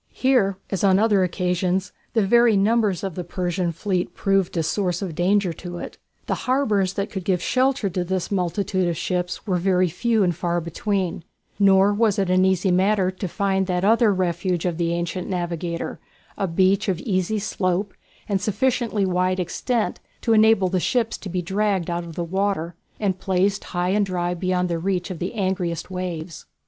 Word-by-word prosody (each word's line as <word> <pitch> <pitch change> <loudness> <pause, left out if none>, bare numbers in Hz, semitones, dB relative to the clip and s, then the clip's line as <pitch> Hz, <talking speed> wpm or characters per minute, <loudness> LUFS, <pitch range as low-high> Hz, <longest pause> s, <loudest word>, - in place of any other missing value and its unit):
Here, 240 -8 +2
as 195 -2 -2
on 190 -1 +5
other 205 -2 +3
occasions, 180 +1 -1 0.2
the 220 -4 +2
very 235 0 +5
numbers 205 -2 +2
of 195 -2 -3
the 180 - -4
Persian 175 0 -2
fleet 180 +2 -2
proved 195 -3 +1
a 165 - +1
source 180 +2 -1
of 180 -4 -4
danger 185 +2 +1
to 175 +2 -8
it. - - -8 0.3
The - - -1 0.2
harbours 210 -8 +2
that 200 +1 -3
could 190 -2 -4
give 185 -1 +1
shelter 255 +3 +1
to 180 +1 -1
this 185 +1 -2
multitude 185 0 0
of 170 -2 -1
ships 180 +4 -2
were 185 -4 +1
very 185 0 +2
few 220 +5 +1
and 175 -3 +1
far 175 +1 -1
between, 175 +1 -2 0.4
nor 195 0 +5
was 210 -1 +2
it 195 -2 +1
an 185 0 +4
easy 190 0 +2
matter 190 +1 +2
to 185 +1 -5
find 190 0 0
that 180 0 0
other 225 +1 +4
refuge 180 -1 -1
of 175 -2 -1
the 170 -1 +1
ancient 170 +1 -3
navigator 175 -2 -3 0.4
a 195 - -1
beach 190 +3 +2
of 180 -3 0
easy 190 0 0
slope 195 -1 -1 0.3
and 195 -2 0
sufficiently 220 0 0
wide 185 0 +1
extent 215 +6 -1 0.2
to 230 - +2
enable 220 -3 +5
the 185 0 0
ships 230 +4 0
to 195 - -7
be 180 0 -2
dragged 195 -1 0
out 170 0 -2
of 165 -2 -9
the 175 - -2
water 185 -1 -1 0.3
and 190 -3 -1
placed 195 +2 0
high 175 0 -1
and 205 +1 +2
dry 175 -1 -1
beyond 180 0 0
the 170 -1 -2
reach 185 +1 -1
of 175 - -6
the 180 +6 -4
angriest 185 -4 -2
waves. 175 -3 -5
185 Hz, 185 wpm, -23 LUFS, 175-200 Hz, 0.4 s, on